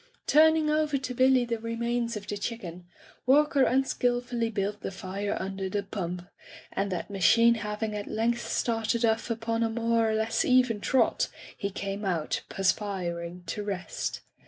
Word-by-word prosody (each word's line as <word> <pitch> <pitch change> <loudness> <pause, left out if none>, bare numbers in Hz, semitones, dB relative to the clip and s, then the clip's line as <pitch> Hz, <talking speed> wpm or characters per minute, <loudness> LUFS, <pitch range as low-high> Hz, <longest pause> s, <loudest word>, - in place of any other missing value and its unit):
Turning 315 +1 +5
over 305 -1 +2
to 260 -1 -4
Billy 255 0 +4
the 230 -1 -2
remains 235 0 -2
of 205 - -8
the 205 - -4
chicken, 185 -5 -5 0.4
Walker 290 +1 +4
unskilfully 245 -2 +1
built 205 -1 -2
the - - -3
fire 195 +1 -4
un 195 +1 -4
der 190 -1 -2
the 200 +1 -1
pump, 180 -3 -4 0.5
and 195 0 -1
that 180 +3 -4
machine 230 +5 +5
having 210 0 -3
at 205 -1 -4
length 235 +2 0
started 230 0 +1
off 225 +1 +1
upon 230 0 -1
a 230 - +2
more 230 0 +1
or 220 - +1
less 220 +1 +1
even 250 -4 +3
trot, 265 - +2 0.3
he 200 - -3
came 195 +1 -4
out, 170 -6 -1
perspiring, 180 -3 -2
to 210 - -4
rest. 195 -3 -4
225 Hz, 160 wpm, -28 LUFS, 195-240 Hz, 0.5 s, Turning